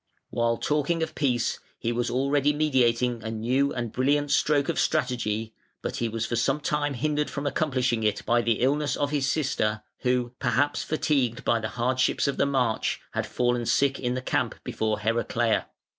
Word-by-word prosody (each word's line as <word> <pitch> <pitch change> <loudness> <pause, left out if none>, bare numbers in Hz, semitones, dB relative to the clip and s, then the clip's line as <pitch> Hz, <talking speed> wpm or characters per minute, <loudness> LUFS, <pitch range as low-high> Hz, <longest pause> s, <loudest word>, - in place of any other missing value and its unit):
While 115 -1 +1
talking 150 +3 0
of - - -4
peace 125 -5 0 0.2
he 115 - -2
was 120 0 -1
already 140 +3 +2
meditating 125 -5 +2
a 110 - -5
new 125 +6 +1
and 120 -3 -3
brilliant 145 +3 +1
stroke 145 -2 +3
of - - -1
strategy, 115 -3 0 0.3
but - - -3
he 115 - -1
was 115 0 -2
for 120 - -2
some 135 +5 +1
time 145 -1 -1
hindered 150 +3 0
from 140 0 -5
accomplishing 130 -6 0
it 105 -1 0
by 120 0 +3
the 115 -2 0
illness 145 +3 +1
of 145 0 -1
his 140 -3 +1
sister, 120 -8 0 0.2
who, 125 -1 0
perhaps 140 +5 +1
fatigued 135 -6 0
by 115 - +3
the 110 -1 -3
hardships 130 +4 +1
of 140 - -1
the 140 - +2
march, 125 -5 0
had - - -2
fallen 120 -1 0
sick 140 -1 +2
in 125 0 -1
the 130 - -4
camp - - 0
before 110 -1 -2
Heraclea. 115 +1 +1
125 Hz, 180 wpm, -26 LUFS, 115-145 Hz, 0.3 s, stroke